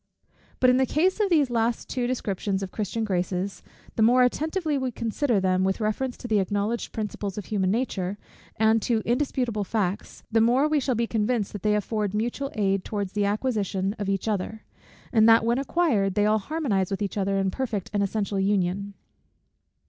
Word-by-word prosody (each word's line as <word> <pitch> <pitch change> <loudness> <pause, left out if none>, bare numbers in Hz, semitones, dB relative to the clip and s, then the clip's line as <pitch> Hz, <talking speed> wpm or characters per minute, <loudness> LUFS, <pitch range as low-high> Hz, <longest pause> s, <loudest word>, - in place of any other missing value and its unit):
But 255 -1 +5
in 250 - +3
the 260 0 +2
case 365 - +1
of 415 -2 +2
these 305 -6 +4
two - - -5
last 230 0 0
descriptions 210 -6 -2
of 190 - -6
Christian 220 +2 -2
graces; 185 -1 -2 0.3
the - - 0
more 245 +3 +6
attentively 310 +5 0
we 260 -2 -1
consider 230 0 0
them 185 0 +1
with 190 +2 0
reference 230 +4 -1
to 245 - -7
the 215 -3 +2
acknowledged 205 +4 -1
principles 210 -2 -4
of 210 - -5
human 195 -3 0
nature, 200 -4 -1 0.4
and 220 +1 +3
to 225 0 0
indisputable 245 -4 0
facts, 200 -2 -3
the 225 0 +4
more 250 +6 +4
we 305 -1 +2
shall 260 -2 0
be 235 +1 +1
convinced 225 -1 -1
that 205 - -6
they 210 +1 +2
afford 210 -1 -1
mutual 240 +5 -2
aid 195 -2 +1
towards 200 -3 -4
the 205 -1 +1
acquisition 200 -3 -1
of 200 -1 -2
each 195 +2 -1
other; 215 +1 -2 0.5
and 220 -1 +6
that 225 0 +6
when 235 +2 +2
acquired, 270 - +1
they 205 - +3
all 215 +1 +3
harmonize 215 - -1
with 195 +1 -2
each 200 - -3
other 195 -1 0
in 195 -1 +1
perfect 215 -5 -3
and 205 - +1
essential 200 0 -1
union. 195 0 0
215 Hz, 190 wpm, -26 LUFS, 195-245 Hz, 0.5 s, more